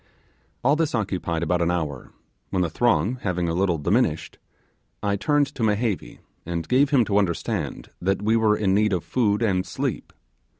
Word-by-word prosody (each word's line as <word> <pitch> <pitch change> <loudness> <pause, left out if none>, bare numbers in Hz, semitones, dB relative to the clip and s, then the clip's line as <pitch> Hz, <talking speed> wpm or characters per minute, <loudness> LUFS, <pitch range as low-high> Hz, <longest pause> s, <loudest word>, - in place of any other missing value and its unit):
All 140 +4 +4
this 155 -4 0
occupied 90 -6 -2
about 85 +1 +1
an 85 - +2
hour, 80 -7 -3 0.4
when 90 - 0
the 85 - -2
throng 115 +3 +1
having 90 -3 -1
a 85 - -1
little 90 -1 +1
diminished, 75 - 0 0.6
I 100 -1 +1
turned 145 +9 +2
to - - -7
Mehevi 105 - -1 0.3
and 85 -1 -4
gave 135 +3 +3
him 135 -5 +4
to 100 -1 +2
understand 85 -5 -2
that 95 +3 0
we 110 +2 +3
were 110 -2 +3
in 95 -3 +1
need 105 0 +2
of 90 - -1
food 110 -3 +1
and 95 -4 +1
sleep. - - -4
100 Hz, 175 wpm, -24 LUFS, 85-115 Hz, 0.6 s, All